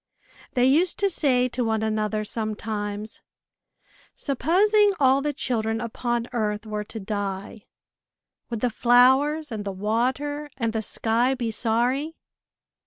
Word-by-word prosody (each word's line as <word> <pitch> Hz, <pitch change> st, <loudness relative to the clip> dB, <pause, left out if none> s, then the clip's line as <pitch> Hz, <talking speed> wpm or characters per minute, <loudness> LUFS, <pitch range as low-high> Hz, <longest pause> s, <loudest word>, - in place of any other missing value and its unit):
They 250 Hz, 0 st, +4 dB
used 325 Hz, +7 st, +3 dB
to 395 Hz, -1 st, +2 dB
say 255 Hz, -6 st, +2 dB
to 250 Hz, +1 st, -2 dB
one 220 Hz, -1 st, 0 dB
another, 215 Hz, 0 st, -1 dB
sometimes, 210 Hz, -1 st, -4 dB, 0.9 s
supposing 400 Hz, -, +3 dB
all 270 Hz, 0 st, +4 dB
the 295 Hz, +1 st, -1 dB
children 225 Hz, -5 st, -1 dB
upon 240 Hz, +1 st, -2 dB
earth 210 Hz, -2 st, -2 dB
were 210 Hz, -1 st, -4 dB
to 220 Hz, -, -7 dB
die, 200 Hz, 0 st, -5 dB, 0.8 s
would 230 Hz, -3 st, -4 dB
the 250 Hz, -, +1 dB
flowers, 265 Hz, +6 st, +4 dB
and 215 Hz, -2 st, -4 dB
the 200 Hz, -, -4 dB
water, 255 Hz, +9 st, -1 dB
and 230 Hz, -3 st, -1 dB
the 220 Hz, -, -1 dB
sky 230 Hz, +4 st, +1 dB
be 235 Hz, -3 st, -3 dB
sorry? 245 Hz, +8 st, 0 dB
235 Hz, 130 wpm, -24 LUFS, 215-270 Hz, 0.9 s, They